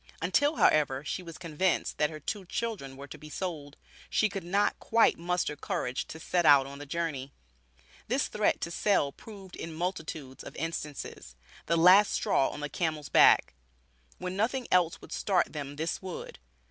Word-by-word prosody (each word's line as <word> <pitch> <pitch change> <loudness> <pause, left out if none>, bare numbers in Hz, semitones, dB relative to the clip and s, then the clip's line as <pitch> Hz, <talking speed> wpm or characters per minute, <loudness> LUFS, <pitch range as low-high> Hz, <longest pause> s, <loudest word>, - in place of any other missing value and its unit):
Until, 285 - +2
however, 145 - +3
she 185 - -3
was 165 -3 -9
convinced 175 +1 -1
that 150 - +3
her 155 - -8
two 195 +7 -4
children 180 -10 -4
were 140 - -8
to 140 - -11
be 155 +1 -11
sold, 150 -4 -5 0.3
she 215 - +2
could 195 -2 -5
not 200 +4 +1
quite 230 -5 +3
muster 175 -3 -1
courage 125 -3 -3
to 160 - -8
set 175 +2 0
out 145 -3 +7
on 140 +1 -9
the 145 - -8
journey. 145 -4 -3 0.7
This - - +1
threat - - +1
to 170 - -3
sell 170 -6 +2
proved 195 +1 -12
in 165 -1 -7
multitudes 160 -6 -4
of - - -10
instances, 150 - -5 0.3
"the 170 - +2
last 185 +5 +7
straw 135 - +2
on 150 - -7
the 150 - -2
camel's 155 -2 -2
back." - - +6 0.6
When 180 0 -4
nothing 240 +5 0
else 175 -2 +3
would - - -13
start 185 -5 +1
them 145 -2 -5
this 160 +3 -3
would. 185 -2 -7
165 Hz, 175 wpm, -29 LUFS, 145-185 Hz, 0.7 s, out